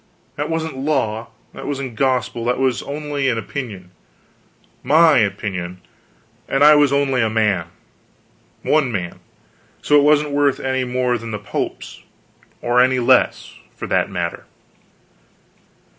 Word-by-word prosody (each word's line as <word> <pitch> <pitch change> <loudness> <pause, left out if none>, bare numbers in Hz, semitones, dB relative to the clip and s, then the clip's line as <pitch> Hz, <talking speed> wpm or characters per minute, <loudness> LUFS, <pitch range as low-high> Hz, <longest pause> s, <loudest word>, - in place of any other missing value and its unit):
That 145 +2 -3
wasn't 160 -4 -3
law; 130 -6 -1 0.3
it - - -8
wasn't 135 -4 -4
gospel: 125 -2 0
it 125 - +1
was 130 -2 0
only 145 -1 -3
an 115 - 0
opinion 105 -6 -6 0.9
my 155 +1 +5
opinion, 90 -4 -3 0.7
and 135 +1 +2
I 150 +1 +9
was 145 -2 +4
only 140 -2 +1
a 110 - +1
man, 105 -6 0 1.0
one 150 -5 +2
man: 90 -5 -4 0.6
so 150 - +2
it - - +3
wasn't 150 0 +3
worth 140 -1 +1
any 130 -1 -1
more 125 -1 0
than 115 +1 -8
the 105 - -3
pope's 105 0 -5 0.6
or 120 +1 +3
any 130 +1 +3
less, 120 - +2 0.2
for - - -6
that - - +1
matter. 85 -1 -4
130 Hz, 135 wpm, -19 LUFS, 110-145 Hz, 1.0 s, I